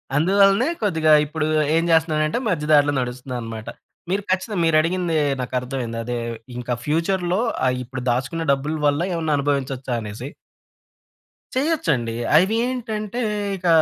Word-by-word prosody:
అందువలనే 195 - +4 0.2
కొద్దిగా 160 -6 +2
ఇప్పుడు 155 +1 -2 0.3
ఏం 165 - +3
చేస్తున్నానంటే 160 +3 +2
మధ్య 150 -5 -1
దారిలో 145 0 +5
నడుస్తున్నానన్నమాట. 120 -3 -5 0.4
మీరు 200 +2 0
ఖచ్చితంగా 190 +2 -1
మీరు 165 -1 +3
అడిగింది 170 0 -1 0.3
నాకు 125 - -6
అర్థమైంది. 125 -3 -4
అదే 120 +1 -3 0.4
ఇంకా 125 0 -3
ఫ్యూచర్‌లో 175 +4 0 0.3
ఆహ్ 125 0 +2
ఇప్పుడు 130 +1 -7
దాచుకున్న 135 +7 -1
డబ్బుల 145 +3 -1
వల్ల 145 +3 +1
ఏమన్నా 160 -2 0
అనుభవించొచ్చా 135 -2 -1
అనేసి? 110 +5 -7 1.3
చేయొచ్చండి. 165 - 0 0.2
అవి 190 +7 +4
ఏంటంటే 230 -2 -3 0.4
ఇక 180 -1 -6
155 Hz, 125 wpm, -22 LUFS, 130-185 Hz, 1.3 s, దారిలో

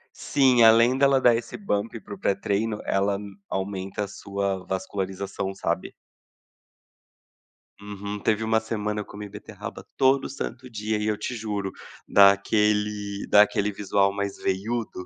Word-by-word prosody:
Sim, 130 -4 +3
além 115 +3 +6
dela 135 0 +4
dar 120 -2 +6
esse 115 - -5
bump 115 - -2
para 100 - -10
o - - -7
pré-treino, 100 +2 -1
ela 100 +1 +1
m 100 -1 -10
aumenta 95 +1 -3
a - - -4
sua 100 -1 -3
vascularização, 95 +1 -3
sabe. 85 -3 -3 1.9
Uhum. 100 0 -6
Teve 110 +1 +1
uma 110 0 +2
semana, 105 -2 -3
eu - - -8
comi 105 0 -9
beterraba 105 +1 -9
todo 135 +1 +3
santo 130 -2 -6
dia 110 -2 -2
e 105 - -2
eu 110 -1 +1
te 105 +4 -4
juro, 105 -4 -3 0.4
dá 100 0 +8
aquele 105 0 0
dá 105 - +8
aquele 105 0 -1
visual 100 0 +1
mais 100 0 -3
veiudo. 100 0 -2
105 Hz, 145 wpm, -25 LUFS, 100-110 Hz, 1.9 s, dá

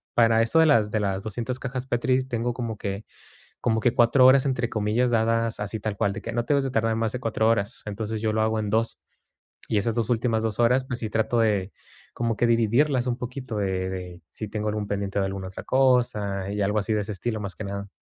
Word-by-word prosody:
para 115 -1 +5
esto 115 +8 +1
de 160 - +6
las 115 -9 +4
de 110 - +1
las 95 -1 -1
200 120 +4 -4
cajas 130 -1 -4
Petris 130 +1 +1
tengo 120 -1 -1
como 115 -3 -4
que 100 +1 -4 0.6
como 110 -2 +1
que 120 - +2
4 125 +2 +5
horas, 130 +1 +6
entre 130 -3 0
comillas, 110 +3 +1
dadas 115 0 +1
así 105 +2 -3
tal 105 -2 -3
cual, 100 - +1
de - - -6
que 115 - -5
no 120 0 -1
te 145 - +1
debes 140 - +2
de 135 - -2
tardar 115 -2 +1
más 115 -1 0
de 125 - -4
4 115 -2 +1
horas. 115 +4 0
Entonces, 105 +1 -4
yo 110 -1 +1
lo 110 - +1
hago 110 0 +1
en 105 - -2
2. 115 +2 0 0.7
Y 110 - +1
esas 110 +3 +1
2 115 -1 -1
últimas 115 -1 +1
2 110 0 -2
horas, 125 +2 +4
pues 125 -2 -4
sí 110 - -3
trato 110 +2 +1
de 105 -4 +1 0.4
como 115 -2 -1
que 120 - +1
dividirlas 120 +3 +2
un 120 0 -1
poquito, 125 -3 -5
eh, 95 -1 -1
de 90 -2 -7
si 110 +1 -6
tengo 105 0 -3
algún 105 -1 -3
pendiente 100 0 -2
de - - +1
algun 95 -1 -5
otra 95 0 -8
cosa 110 -7 +1
y 105 0 -2
algo 105 +2 +1
así 105 +2 -3
de 105 - +1
ese 105 +1 -4
estilo, 110 +3 -3
más 100 -4 -5
que - - -6
nada. 100 0 -5
110 Hz, 245 wpm, -25 LUFS, 105-120 Hz, 0.7 s, de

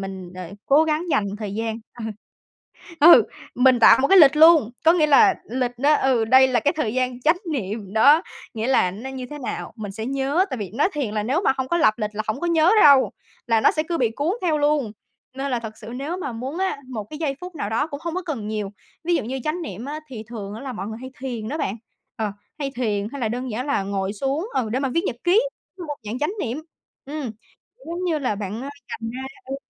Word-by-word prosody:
mình, 190 -2 -7
ờ, 180 -2 -7 0.2
cố 290 +3 +5
gắng 310 +1 0
dành 275 -8 +2
thời 205 -2 -5
gian. 225 +1 -3 1.2
Ờ, 340 +4 +10
ừ, - - +9 0.3
mình 250 -1 +4
tạo - - +8
một 275 - +3
cái 390 - +7
lịch 290 -4 +7
luôn, 315 -7 +7
có 330 - +7
nghĩa 315 -4 +3
là 375 +7 +6 0.2
lịch 250 0 -1
đó, 290 +3 +4
ừ, 255 -6 +2
đây 260 +3 +6
là 250 -2 +2
cái 290 - +2
thời 235 -8 -1
gian 255 -1 -1
chánh 315 +6 +3 0.2
niệm 205 -5 -4
đó, 285 +9 +6 0.3
nghĩa 220 0 -2
là 255 -8 +3
nó 225 +8 -7
như 260 -1 -6
thế 295 - -7
nào 260 - -5
mình 210 -3 -6
sẽ 220 +2 -5
nhớ, 275 +6 +1
tại 260 - -2
vì 200 -4 -5
nói 300 +9 +2
thiền 265 -8 -3
là 210 - 0
nếu 275 - 0
mà - - +4
hông 265 -1 -3
có 340 - +1
lập 215 -8 +4
lịch 210 -2 -2
là 215 - -2
hổng 215 +6 -2
có 345 - -1
nhớ 335 +2 +4
đâu, 280 -3 +6 0.3
là 230 -2 +3
nó - - +5
sẽ 310 - -1
cứ 335 - -1
bị 235 -3 +2
cuốn 300 +5 0
theo 315 -4 +1
luôn. 290 -7 +1 0.4
Nên 275 +1 -3
là 245 -2 0
thực 220 -1 -8
sự 220 - -11
nếu 290 +7 -4
mà 320 -9 -4
muốn 260 +8 -5
á, 380 -6 -1
một 220 -5 -5
cái 300 - -7
giây 290 -4 -2
phút 360 0 -8
nào 220 -9 -4
đó 255 +7 +1
cũng 285 -2 -7
hông 335 -1 -3
có 370 - -2
cần 275 - -4
nhiều. 210 -2 -3 0.3
Ví 345 +1 +2
dụ - - -1
như 260 +4 -4
chánh 315 +3 -2
niệm 225 - -7
á 295 +3 -5
thì 225 -4 -6
thường 210 -4 -7
á 220 - -8
là 270 -2 -5
mọi 195 -4 -5
người 220 - -6
hay 260 0 -8
thiền 235 -5 -4
đó 300 +5 -3
bạn, 205 -8 -2 0.4
ờ, 215 -2 -2 0.3
hay 280 -2 -2
thiền 210 -4 -1
hay 280 - -6
là 225 - 0
đơn 250 +3 -4
giản 240 +5 -3
là 280 -8 0
ngồi 195 0 -2
xuống, 275 - -2
ừ, 240 -4 0
để 255 - +1
mà 270 - 0
viết 335 - +2
nhật 235 - -2
ký, 370 +6 +5 0.4
một 295 -1 -4
dạng 215 +4 -4
chánh 300 +7 -1
niệm. 255 +3 -3 0.4
Ừm, 285 -3 -4 0.6
giống 345 +2 -4
như 330 -4 0
là 255 -7 -1
bạn, 205 +3 -5
a, 280 - -5 0.2
dành 225 0 -5
ra, 255 +3 -6 0.2
ừ, 270 - -4
260 Hz, 255 wpm, -23 LUFS, 220-300 Hz, 1.2 s, Ờ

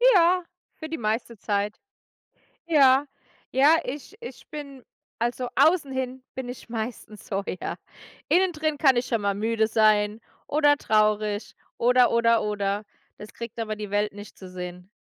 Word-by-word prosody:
Ja, 360 +1 +4 0.3
für 315 -1 -8
die 325 - -3
meiste 225 +1 -2
Zeit. 205 +1 -2 0.9
Ja, 280 -4 +5 0.4
ja, 290 +5 +5
ich 290 +10 -7
ich 475 - -10
bin 280 -4 -8 0.4
also 240 +2 -1
außen 315 -5 +4
hin 260 0 -4
bin 260 -1 -5
ich 245 -1 -9
meistens 220 -2 -6
so, 195 0 -2 0.2
ja. - - -4 0.5
Innen 370 +1 +3
drin 310 -2 -2
kann 270 -5 +5
ich 240 - 0
schon 230 -3 0
mal 200 -1 0
müde 220 +2 +1
sein 215 -1 +3 0.3
oder 290 -1 +4
traurig, 215 -2 +1 0.2
oder 245 +1 +4
oder 230 -1 +3
oder. 205 0 -1 0.3
Das 210 - -10
kriegt 235 -1 -8
aber 215 -2 -3
die 210 -1 -6
Welt 205 +1 0
nicht 205 +1 -11
zu 190 - -10
sehen. 180 0 -8
230 Hz, 155 wpm, -25 LUFS, 210-275 Hz, 0.9 s, Ja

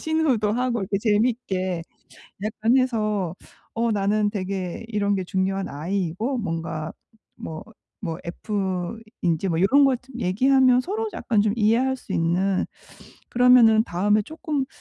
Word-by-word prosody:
시누도 300 -10 +1
하고 245 0 0
이렇게 195 +1 -1
재미있게 205 -5 0 0.6
약간 220 +3 0
해서 215 -8 0 0.4
어 230 0 +1
나는 205 +1 +1
되게 190 -2 -4
이런 205 -2 0
게 190 -2 -2
중요한 190 +1 -1
I이고 185 - -2
뭔가 165 -5 -4 0.4
뭐 160 -1 -7 0.4
뭐 165 -5 -3
F인지 190 -1 -3
뭐 165 0 0
요런 275 +9 +5
거 270 -1 +4
좀 245 +1 -13
얘기하면 255 +5 +4
서로 425 +9 -3
약간 215 -4 +1
좀 210 -1 +1
이해할 235 +4 +2
수 195 - -6
있는 180 +3 +1 0.7
그러면은 240 -3 +6
다음에 205 +4 +1
쪼끔 305 - -3
210 Hz, 270 characters per minute, -24 LUFS, 185-245 Hz, 0.7 s, 그러면은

